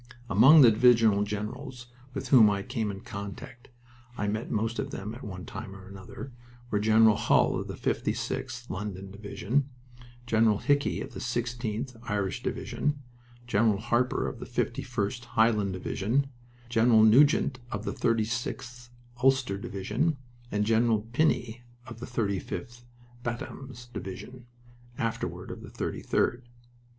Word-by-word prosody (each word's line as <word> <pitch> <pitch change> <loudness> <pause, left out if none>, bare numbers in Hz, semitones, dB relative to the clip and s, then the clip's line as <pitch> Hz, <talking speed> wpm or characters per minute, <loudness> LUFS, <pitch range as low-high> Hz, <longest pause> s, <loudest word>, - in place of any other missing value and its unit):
Among 135 +10 +8
the 120 -4 +8
divisional 115 -2 +5
generals 120 +4 -5 0.2
with 125 - -4
whom 115 -6 +8
I 100 -1 -1
came 120 -4 -2
in 100 -1 -6
contact 100 +4 -8 0.5
I 105 - -1
met 110 +2 -2
most 115 +2 -1
of - - -2
them 105 +3 -5
at 125 +4 -10
one 95 -3 -7
time 95 - -7
or 95 -1 -12
another 100 +8 -9 0.4
were 105 - +2
General 110 0 +5
Hull - - +3
of - - -5
the - - -5
56th 120 -2 -2
(London) 100 -1 -5
Division, 110 +7 -2 0.6
General 110 -3 +3
Hickey 145 +5 +1
of - - -7
the - - -6
16th 120 +1 -3
(Irish) 100 -2 -1
Division, 150 0 -2 0.5
General 110 -2 +2
Harper 120 +3 0
of - - -6
the - - -7
51st 120 -1 -2
(Highland) 110 -4 +2
Division, 115 +9 -1 0.4
General 115 -1 +5
Nugent 130 +3 +5
of 105 0 -4
the - - -2
36th 120 +2 -2 0.3
(Ulster) 130 -7 +3
Division, 105 - -1 0.3
and 105 0 +1
General 115 0 +3
Pinnie 120 -5 +1 0.2
of 115 -2 -10
the 120 - -6
35th 120 +1 -3 0.4
(Bantams) 120 +1 -6
Division, 120 +5 -8 0.5
afterward 115 -1 -3
of - - -8
the - - -10
33d. 120 - -1
115 Hz, 135 wpm, -28 LUFS, 105-125 Hz, 0.6 s, Among